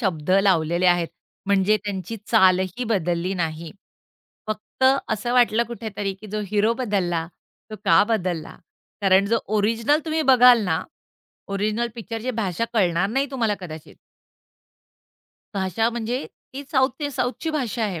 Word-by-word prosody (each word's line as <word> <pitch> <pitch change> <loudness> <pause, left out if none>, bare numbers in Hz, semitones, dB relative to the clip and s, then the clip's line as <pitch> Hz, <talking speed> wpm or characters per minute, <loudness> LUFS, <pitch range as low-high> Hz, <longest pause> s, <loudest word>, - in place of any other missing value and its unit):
शब्द 180 - -2
लावलेले 175 -2 +2
आहेत. 175 -2 +3 0.4
म्हणजे 200 +1 +3
त्यांची 195 +1 -4
चाल 190 -5 +5 0.2
ही 250 - -2
बदलली 180 -3 -1
नाही. 165 -2 -3 0.8
फक्त 215 +4 -3 0.2
असं 225 +3 -2
वाटलं 235 -2 +4
कुठेतरी, 210 -4 -4
की 195 +3 -13
जो 215 +1 -2
हीरो 215 +2 +2
बदलला 185 -9 -1 0.4
तो 215 - -6
का 195 - +6
बदलला. 180 -7 -2 0.5
कारण 195 0 +4
जो 230 +3 +2 0.2
ओरिजिनल 230 +7 +2
तुम्ही 315 0 0
बघाल 245 -2 +7
ना. 160 -4 0 0.7
ओरिजिनल 215 +4 -1
पिक्चरची 230 +1 -5
भाषा 190 +2 -1
कळणार 185 -2 +2
नाही 270 +3 0
तुम्हाला 230 -6 0
कदाचित. 160 -4 -10 1.6
भाषा 195 +4 0
म्हणजे 240 +3 -3 0.3
ती 275 +2 -6
साउथ 265 -2 +3
ते 290 -1 -2
साउथची 260 +5 -2
भाषा 250 -6 -2
आहे, 185 -5 -3
210 Hz, 135 wpm, -23 LUFS, 185-235 Hz, 1.6 s, बघाल